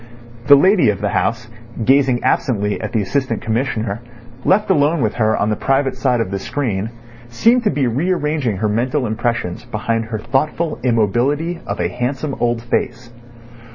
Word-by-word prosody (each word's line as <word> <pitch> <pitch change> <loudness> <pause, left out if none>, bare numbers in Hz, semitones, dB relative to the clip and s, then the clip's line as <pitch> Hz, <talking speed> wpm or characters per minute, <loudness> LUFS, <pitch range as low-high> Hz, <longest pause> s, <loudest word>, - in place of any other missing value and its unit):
The 140 - +9
lady 185 - +4
of 100 -2 -1
the 105 - -1
house, 115 +3 -1 0.4
gazing 135 -1 +3
absently 105 -8 0
at 110 - -4
the 110 - 0
Assistant 130 0 -1
Commissioner, 115 -2 -2 0.4
left 200 +1 +2
alone 150 -1 +2
with 110 -3 0
her 110 -2 +2
on 105 - 0
the - - +1
private 135 +2 0
side 130 -2 +1
of 110 -4 -2
the 100 - -2
screen, 110 -3 -2 0.4
seemed 230 - +3
to - - +4
be 140 -2 0
rearranging 150 - 0
her 110 +3 0
mental 125 +6 0
impressions 110 -4 -2
behind 115 -1 -2
her 110 -1 -4
thoughtful 150 +8 -1
immobility 130 - +1
of - - -3
a - - +1
handsome 135 +4 -3
old 120 -1 0
face. 120 0 -2
120 Hz, 165 wpm, -18 LUFS, 110-140 Hz, 0.4 s, The